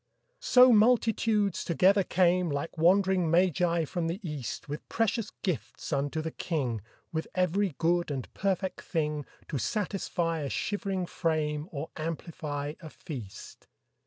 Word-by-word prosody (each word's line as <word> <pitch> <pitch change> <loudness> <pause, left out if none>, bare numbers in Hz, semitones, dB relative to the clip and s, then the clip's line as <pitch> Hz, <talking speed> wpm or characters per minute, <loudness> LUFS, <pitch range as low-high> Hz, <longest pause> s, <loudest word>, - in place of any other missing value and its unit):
So 250 0 +7
multitudes 220 -3 +3
together 190 +4 +4
came, 180 -1 +2
Like 145 +3 -3
wandering 185 +1 +3
magi 170 -1 +3
from 165 +2 -2
the 170 +4 -3
East 145 -7 -5
With 150 +1 -6
precious 225 -1 0
gifts 175 -3 -3
unto 145 +3 -1
the 160 - -3
King, 130 - -2 0.3
With 160 0 -2
every 185 -1 +1
good 170 0 +1
and 135 -3 -3
perfect 190 -1 -1
thing 150 -4 -2 0.2
To 145 - -2
satisfy 180 - -1
a 145 -2 -3
shivering 195 -1 -2
frame 155 -2 -1
Or 155 +1 -5
amplify 155 -2 -4
a 160 - -8
feast. 120 - -9
170 Hz, 130 wpm, -29 LUFS, 150-190 Hz, 0.3 s, So